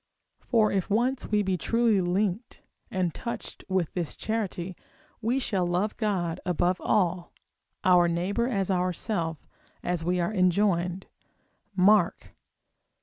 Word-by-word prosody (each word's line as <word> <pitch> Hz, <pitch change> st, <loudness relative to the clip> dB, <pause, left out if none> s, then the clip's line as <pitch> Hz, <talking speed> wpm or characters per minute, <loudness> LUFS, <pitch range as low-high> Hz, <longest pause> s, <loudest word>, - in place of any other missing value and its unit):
For 220 Hz, -3 st, +2 dB
if 195 Hz, -2 st, -1 dB
once 245 Hz, +5 st, +1 dB
we 210 Hz, -1 st, +2 dB
be 190 Hz, -2 st, 0 dB
truly 230 Hz, +2 st, +2 dB
linked 195 Hz, +5 st, -1 dB, 0.3 s
and 180 Hz, -4 st, -1 dB
touched 235 Hz, -, -6 dB
with 185 Hz, -4 st, 0 dB
this 175 Hz, -4 st, -3 dB
charity, 190 Hz, -5 st, -3 dB, 0.5 s
we 235 Hz, +4 st, +1 dB
shall 195 Hz, -9 st, 0 dB
love 180 Hz, +5 st, 0 dB
God 185 Hz, -7 st, -1 dB
above 180 Hz, +1 st, 0 dB
all, 180 Hz, -4 st, +1 dB, 0.5 s
our 180 Hz, -1 st, +5 dB
neighbour 185 Hz, +8 st, 0 dB
as 195 Hz, -6 st, 0 dB
ourself, 180 Hz, -3 st, -2 dB, 0.4 s
as 175 Hz, -2 st, -1 dB
we 180 Hz, +2 st, 0 dB
are 175 Hz, +5 st, 0 dB
enjoined, 185 Hz, -1 st, +1 dB, 0.7 s
Mark 200 Hz, +3 st, +4 dB
xii. -, -, -18 dB
185 Hz, 130 wpm, -27 LUFS, 175-215 Hz, 0.7 s, our